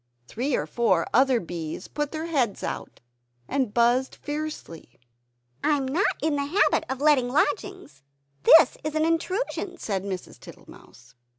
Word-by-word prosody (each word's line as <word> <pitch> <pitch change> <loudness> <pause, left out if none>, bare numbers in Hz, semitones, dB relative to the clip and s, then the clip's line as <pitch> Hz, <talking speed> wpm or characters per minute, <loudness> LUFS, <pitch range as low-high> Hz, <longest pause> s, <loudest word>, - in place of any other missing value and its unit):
Three 255 +4 -2
or - - -1
four 190 -8 +1
other 260 -1 +4
bees 170 0 -6
put 295 -1 -3
their 315 0 -4
heads 265 -11 -1
out, - - -6 0.5
and 265 -6 -1
buzzed 240 +3 +2
fiercely. 290 - -7 0.6
"I 295 - +3
am 270 -1 -3
not 340 +10 +1
in 305 -2 +1
the 280 - -1
habit 370 +9 +2
of 265 +1 -4
letting 290 -5 +3
lodgings; 375 - -2 0.4
this 320 - +7
is 310 0 -4
an 310 0 +2
intrusion!" 360 +3 -2
said 195 - -3
Mrs. 190 -2 -6
Tittlemouse. - - -16
275 Hz, 150 wpm, -25 LUFS, 235-310 Hz, 0.6 s, this